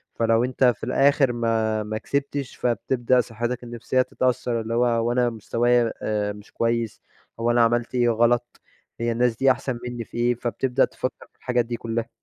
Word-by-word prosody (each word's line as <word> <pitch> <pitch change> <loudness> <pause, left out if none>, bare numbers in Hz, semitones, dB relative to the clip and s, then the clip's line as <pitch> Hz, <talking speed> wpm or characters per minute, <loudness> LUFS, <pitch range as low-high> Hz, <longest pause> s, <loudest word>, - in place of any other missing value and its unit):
فلو 115 0 +2
أنت 130 +1 -1
في 125 -4 +3
الآخر 135 +1 +3
ما 110 -2 0
ما 110 +1 -4
كسبتش 140 +2 -3
فتبدأ 125 +1 +1
صحتك 120 +2 -4
النفسيّة 120 +2 -1
تتأثر، 125 -2 -1
اللي 110 +1 -4
هو 120 +1 +3
هو 115 0 +1
أنا 120 0 +2
مستوايا 115 +1 +1
آآ، 105 -1 -1
مش 105 0 -14
كويّس 115 -1 -1 0.4
هو 115 +1 +2
أنا 120 0 +4
عملت 120 +2 0
إيه 120 -1 +3
غلط؟ 120 +1 +1 0.4
هي 115 0 0
الناس 120 0 +1
دي 135 +1 +4
أحسن 130 -2 -3
مِنّي 120 -1 -4
في - - -10
إيه؟ 120 +1 +2
فتبدأ 125 +2 0
تفكّر 130 - -6
في - - -38
الحاجات 125 -2 0
دي 120 0 -4
كلّها. 115 0 -3
120 Hz, 180 wpm, -24 LUFS, 115-125 Hz, 0.4 s, أنا